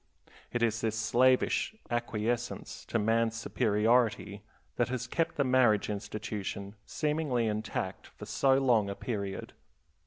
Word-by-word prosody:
It 120 - 0
is 110 -1 +1
this 110 -1 -1
slavish 125 - +2 0.2
acquiescence 120 0 -2
to - - -1
man's 115 +1 +2
superiority 110 -2 +1 0.4
that 120 - +2
has 125 -1 -2
kept 165 +6 -1
the 140 - +2
marriage 125 -6 +3
institution 105 -1 -5
seemingly 150 -6 0
intact 105 -3 -3
for - - -11
so 135 -1 +3
long 120 -7 +3
a 100 - -4
period. 100 -5 -4
115 Hz, 125 wpm, -30 LUFS, 105-125 Hz, 0.4 s, marriage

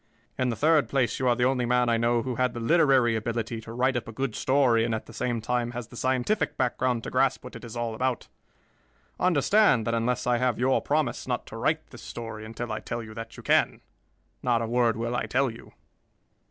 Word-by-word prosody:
In 130 -1 0
the 115 - -1
third 155 +5 +3
place, 135 -3 0
you 130 - +1
are 120 - +4
the 125 0 +1
only 130 -1 +1
man 125 0 +2
I 115 - +3
know 115 0 +1
who 130 - -3
had 125 -1 0
the - - -4
literary 130 -3 +4
ability 115 +1 -3
to 115 - -10
write 130 +3 +1
up 120 - -3
a - - -6
good 130 +1 -3
story 130 -4 +3
and 115 -1 0
at 110 - -5
the - - -13
same 120 -2 -2
time 120 +1 -1
has 120 -2 -6
the - - -12
scientific 130 - 0
background 125 -2 0
to - - -6
grasp - - +1
what - - -10
it - - -9
is 115 0 -8
all 120 -1 -2
about. 125 +1 -2 0.9
Understand 180 - +3
that 115 - -1
unless 115 +1 0
I 120 -1 +2
have 125 -2 +1
your 130 +2 +2
promise 145 -4 -1
not - - -2
to - - -10
write - - -1
this - - -11
story 115 -2 -7
until 115 +1 -6
I 110 - -2
tell 115 0 -5
you 110 -1 -10
that 115 +1 -8
you - - -10
can, - - +2 0.6
not 120 -2 +2
a 115 - -1
word 120 -1 +2
will 115 +1 -2
I - - -1
tell 135 -1 +1
you." 115 - -13
120 Hz, 235 wpm, -27 LUFS, 115-130 Hz, 0.9 s, are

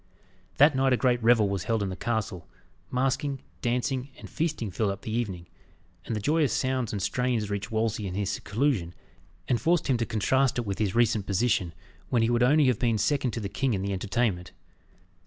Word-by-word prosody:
That 145 +1 +6
night 135 0 +3
a - - +3
great 125 -2 +2
revel 115 -2 +4
was 100 -3 -3
held 115 -2 0
in 100 - -2
the 95 - -4
castle. 110 -7 -3 0.4
Masquing, 135 +2 -1 0.2
dancing, 125 +2 -1
and - - -10
feasting 150 - -2
filled 105 +3 0
up 100 - -5
the 110 - -5
evening, 95 -8 -3 0.6
and 115 - -3
the - - -1
joyous 150 +6 +2
sounds 130 -3 0
and 105 - -3
strains 115 0 -1
reached 100 0 -3
Wolsey 110 -2 -1
in 90 - -5
his 100 -1 -1
seclusion, 100 - -1 0.5
and 120 - +1
forced 170 0 +2
him 130 -3 +2
to 115 - -1
contrast 130 +5 +1
it 120 - -1
with 100 0 -3
his 100 -4 0
recent 115 -4 +2
position, 100 -3 +1 0.4
when 120 -3 +2
he 115 - +2
would 120 0 +2
have 130 -2 +4
been 115 -3 +1
second 140 +4 +1
only - - -1
to - - -3
the 100 - -4
king 130 -1 0
in 95 - -3
the 100 0 -2
entertainment. 95 -2 -1
115 Hz, 205 wpm, -27 LUFS, 100-130 Hz, 0.6 s, That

